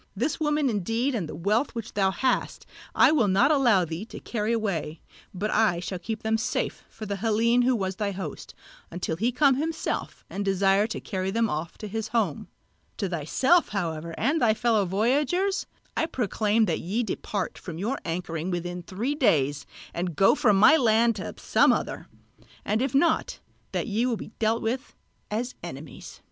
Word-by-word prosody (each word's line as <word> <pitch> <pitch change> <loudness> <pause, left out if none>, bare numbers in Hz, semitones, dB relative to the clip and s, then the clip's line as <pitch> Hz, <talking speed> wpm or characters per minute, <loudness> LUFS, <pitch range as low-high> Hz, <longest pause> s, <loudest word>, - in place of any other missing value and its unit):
This 270 +10 -1
woman 300 -2 +1
indeed 230 +5 0
and 190 -10 -2
the - - -6
wealth 210 - 0
which 230 -3 -6
thou 195 -2 +2
hast 255 +7 -1 0.3
I - - +6
will 265 -9 +3
not 200 +10 +4
allow 240 - +4
thee 165 +4 -5
to - - -9
carry 215 -1 -2
away, 180 -9 -2 0.3
but 205 +3 -3
I 210 -5 +3
shall 180 +1 -5
keep 220 +4 -5
them 220 0 +1
safe - - -2
for 215 - -8
the 200 -1 -3
Hellene 230 +3 +2
who 250 +1 +3
was 190 -3 -2
thy 205 -1 -1
host, 195 -1 -7 0.3
until 175 -2 -3
he 225 +9 0
come 270 +1 +3
himself 320 +2 -3
and 200 - -4
desire 195 +1 +3
to 225 - -4
carry 190 -2 -3
them 225 +2 +1
off 155 +2 -4
to 215 - -7
his 220 +1 -3
home; 215 -11 -1 0.5
to 200 - -1
thyself 255 - +2
however 165 -4 -3
and 310 +4 +1
thy 220 -2 +4
fellow 225 -3 +2
voyagers 285 - +1 0.3
I 325 - +1
proclaim 220 - +1
that 170 -5 -1
ye 210 +8 -1
depart 205 -1 -3
from 170 -4 -7
your 220 +10 -2
anchoring 165 0 -3
within 175 0 -3
three 210 +11 -3
days 145 - +1 0.3
and 175 -1 -3
go 195 - +5
from 210 -8 +3
my 260 +11 +7
land 230 -3 +3
to 185 - -5
some - - +3
other; - - -2 0.6
and 215 +3 +1
if 270 0 -1
not, 320 +4 +2 0.3
that - - -1
ye 225 +3 0
will 235 -3 0
be - - -9
dealt 225 +1 +1
with 250 +5 -3 0.3
as 240 +4 -2
enemies." - - -9
215 Hz, 180 wpm, -26 LUFS, 185-245 Hz, 0.6 s, my